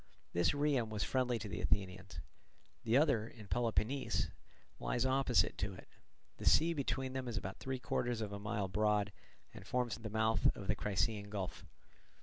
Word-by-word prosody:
This 85 0 +3
Rhium 145 -6 +1
was 105 -2 -1
friendly 125 -2 +1
to 110 -1 -5
the 90 - -4
Athenians. 90 -4 -1 0.6
The 115 +3 +4
other, 135 -7 +3
in 110 -2 -12
Peloponnese, 120 +4 0 0.5
lies 120 +1 0
opposite 130 -2 +3
to 100 0 -2
it; - - -12 0.5
the - - -7
sea 170 +2 +5
between 135 -3 -1
them 130 -1 -3
is 115 -3 -3
about 95 -1 -4
three 130 0 -2
quarters 120 -1 -1
of 105 -2 -3
a 100 - -4
mile 100 -1 -1
broad, 105 +1 +2 0.4
and - - -10
forms 125 -3 0
the 110 -1 -5
mouth 110 +1 +2
of 100 - -6
the 105 - +1
Crissaean 105 +1 0
gulf. 100 -3 -5
110 Hz, 170 wpm, -36 LUFS, 100-125 Hz, 0.6 s, sea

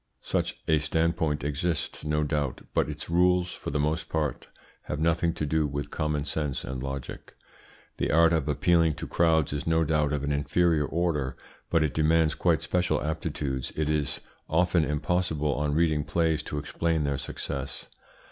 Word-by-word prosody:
Such - - -1
a 80 -1 +4
standpoint 80 0 0
exists 75 +3 -2
no 75 0 +1
doubt, 75 -3 -1
but 65 - +1
its 75 0 -6
rules 90 +1 +3
for - - -6
the 75 - -1
most 75 +3 -1
part 75 -2 -2 0.4
have 75 - -3
nothing 85 +1 +2
to 75 - -2
do 75 +1 +1
with 70 0 -4
common 75 -2 -1
sense 75 -2 -2
and 65 0 -5
logic. 70 -1 -6 0.6
The - - 0
art 85 +1 +5
of 80 -3 +1
appealing 80 +1 +3
to - - -6
crowds 80 -4 +2
is 75 +1 -3
no 80 0 +3
doubt 75 -2 +1
of 75 -2 -1
an 70 - -1
inferior 75 +2 +2
order, 80 -6 -1 0.3
but 85 -2 +3
it 75 - -1
demands 80 0 +3
quite - - +1
special 90 -4 +1
aptitudes. 75 -4 -3
It 75 0 0
is 75 -2 -1 0.3
often 85 +1 +3
impossible 75 0 0
on 75 +1 -1
reading 80 -2 +2
plays 80 +1 +1
to 75 - -5
explain 80 +2 -1
their 70 -2 -1
success. 70 +1 -5
75 Hz, 170 wpm, -27 LUFS, 75-80 Hz, 0.6 s, art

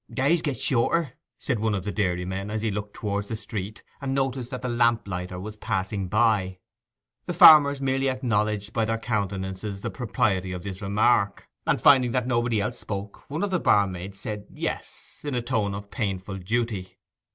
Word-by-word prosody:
'Days 145 +5 +2
get 145 -7 -2
shorter,' 140 +5 +1 0.2
said 125 -5 -2
one 110 -1 +1
of 95 - -3
the 105 - -3
dairymen, 95 0 -2
as 110 0 -3
he 110 - +1
looked 105 +1 -5
towards 100 -1 -2
the 110 - -3
street, 105 -1 -6 0.2
and 135 -1 -2
noticed 135 -2 -1
that 130 0 -6
the - - -1
lamp 120 -2 +2
lighter 90 -1 -4
was 105 +3 -7
passing 100 -2 -2
by. 105 -3 +2 0.7
The - - -2
farmers 145 -3 +8
merely 135 0 +1
acknowledged 105 -5 -1
by 115 - +1
their 115 +1 0
countenances 100 -3 -3
the - - -3
propriety 100 -6 0
of 90 - -6
this 95 -1 -6
remark, 100 0 +2 0.2
and - - +2
finding 125 -4 +5
that 125 -2 +1
nobody 120 -2 +1
else 120 +4 -3
spoke, 100 0 -6
one 150 +6 -2
of 205 - -1
the 185 - +2
barmaids 95 - +1
said 105 0 -5
'yes,' - - -6
in 145 -3 -3
a 120 - 0
tone 110 -5 0
of 100 0 -8
painful 95 -4 -3
duty. 105 -1 -2
105 Hz, 185 wpm, -26 LUFS, 100-125 Hz, 0.7 s, farmers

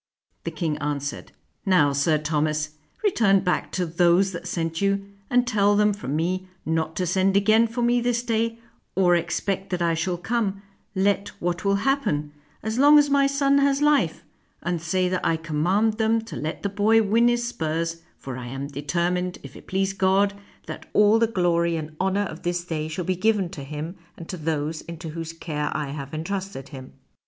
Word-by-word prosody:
The - - -1
king 155 -1 -2
answered, 145 -1 -3 0.3
"Now, 180 -8 +4
Sir 145 +3 +2
Thomas, 155 0 0 0.3
return 210 - +3
back 180 -1 -1
to 180 - 0
those 175 +3 +3
that 170 -2 -6
sent 165 0 -2
you, 200 0 +1 0.2
and 245 0 +3
tell 205 -3 +3
them 210 0 +3
from 150 -9 -4
me 185 +4 -1 0.2
not 160 0 -1
to 185 - -1
send 190 +2 +2
again 220 +3 +4
for 235 +2 -3
me 240 0 +3
this 240 0 0
day 230 -1 0 0.4
or 180 -2 +4
expect 190 +3 -2
that 180 -1 -2
I 170 -1 +2
shall 175 +2 -1
come, 200 0 -2 0.3
let 200 +1 +1
what 175 0 -2
will 200 0 +2
happen, 155 - 0 0.3
as 220 +3 -2
long 290 +2 +8
as 290 -1 +4
my 280 0 +4
son 275 0 +3
has 280 0 +3
life; 290 - +2 0.4
and 170 -1 -1
say 180 +3 +1
that 185 0 -1
I 165 - +2
com 155 -2 -3
mand 205 +6 +3
them 225 +1 +3
to 225 - -9
let 155 +2 -4
the 200 - 0
boy 215 +3 +3
win 225 +3 +3
his 240 0 +1
spurs, 165 -4 -2 0.2
for 130 -2 -7
I 125 -1 -6
am 135 +3 -5
deter 150 +5 -1
mined, 180 0 -2
if 140 -1 -11
it - - -13
please 195 0 0
God, 195 +1 +2 0.3
that - - -8
all 210 +2 +5
the 230 - +3
glory 170 -4 +1
and 155 -1 -5
honor 190 +2 +1
of 165 -3 -8
this 175 0 -2
day 155 -3 -3
shall 165 +3 -4
be 185 - 0
given 200 -1 +1
to 155 -6 -8
him 150 +5 -6 0.2
and 165 - -9
to 185 - -4
those 155 0 -2
into 170 -1 -8
whose 165 +1 -5
care 150 -3 -3
I 150 -2 -3
have 140 -1 -6
entrusted 165 -3 -4
him." 130 -3 -10
180 Hz, 200 wpm, -24 LUFS, 160-205 Hz, 0.4 s, long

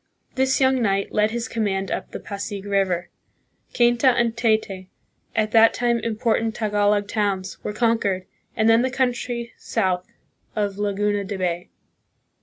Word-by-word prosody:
This 265 0 +2
young 260 -1 +3
knight 195 -3 0
led 210 0 +2
his 235 +2 -3
command 195 -5 -1
up - - -3
the - - -7
Pasig 200 0 -6
River. 195 -3 0 0.7
Cainta 240 +2 +3
and 240 -2 +3
Taytay, 215 -5 0 0.5
at 215 -1 +1
that 225 0 +6
time 240 -1 +1
impor 225 0 0
tant 225 0 -2
Tagalog 205 -2 +1
towns, 200 -3 -2
were - - -2
conquered, 210 -4 0 0.3
and 220 - +2
then 225 +1 +6
the 260 - +1
coun 260 -1 +1
try 235 -1 -5
south 185 -5 -1 0.5
of 205 -2 -1
Laguna 205 0 0
de 200 0 -5
Bay. 175 -1 -2
215 Hz, 155 wpm, -23 LUFS, 200-235 Hz, 0.7 s, that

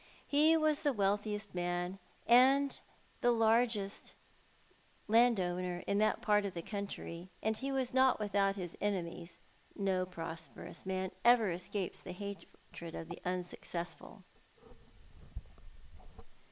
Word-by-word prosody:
He 310 +3 +5
was 310 -1 +2
the 290 -3 +1
wealthiest 205 0 -1
man 175 +1 -2 0.3
and 265 +4 +5 0.4
the 240 - +4
largest 225 -3 +1 0.9
landowner 185 -6 +2
in 200 - +1
that 215 0 +2
part 210 -1 +4
of 195 -3 -4
the 170 - -4
county, 190 -4 -6
and 220 0 +1
ho 270 +4 -3
was 260 -2 -1
not 260 -2 +4
without 200 -1 +1
his 180 -3 -5
enemies— 175 -4 -2 0.4
no 190 -2 0
prosperous 165 0 -8
man 190 0 -2
ever 235 -5 +5
escapes 180 +2 -3
the 180 - -8
hatred 190 -3 -9
of 165 - -7
the 170 - -7
unsuccessful. 175 -1 -5
200 Hz, 115 wpm, -34 LUFS, 180-230 Hz, 0.9 s, He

